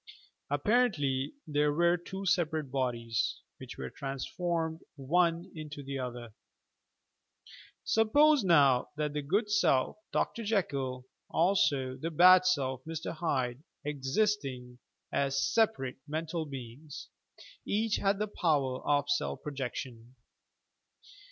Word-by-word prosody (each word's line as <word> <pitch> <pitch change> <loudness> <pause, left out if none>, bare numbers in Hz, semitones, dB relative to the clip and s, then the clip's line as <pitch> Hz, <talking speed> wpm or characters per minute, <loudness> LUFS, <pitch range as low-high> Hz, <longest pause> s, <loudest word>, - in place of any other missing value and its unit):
Ap 145 0 -1
parently 150 - +1
there 150 -1 +1
were 170 +3 +3
two 190 +3 -7
separate 160 -6 0
bodies, 120 -4 -1 0.2
which - - -9
were 65 -1 -6
transformed 160 +4 -3 0.2
one 170 +5 +1
into 155 -2 -8
the 135 0 -5
other! 120 -3 -6 1.5
Suppose 290 +5 +4
now, 140 -8 +4
that 150 -1 -1
the 150 - -2
good 205 +9 0
self, 170 -9 +2
Dr. 230 - -1
Jekyll, 140 - -1 0.2
also 145 -8 +2
the 160 +5 -3
bad 185 +3 +7
self, 130 -7 0
Mr. 160 -1 -5
Hyde, 135 -6 -1 0.2
existing 135 -4 -1 0.3
as 140 0 0
separate, 220 - +1
mental 160 +1 -3
beings, 135 +2 -9 0.5
each 215 +1 0
had 195 0 +1
the 210 - 0
power 145 -10 0
of 145 -1 +1
self 145 0 -1
projection. 125 -3 -6
150 Hz, 115 wpm, -31 LUFS, 130-180 Hz, 1.5 s, bad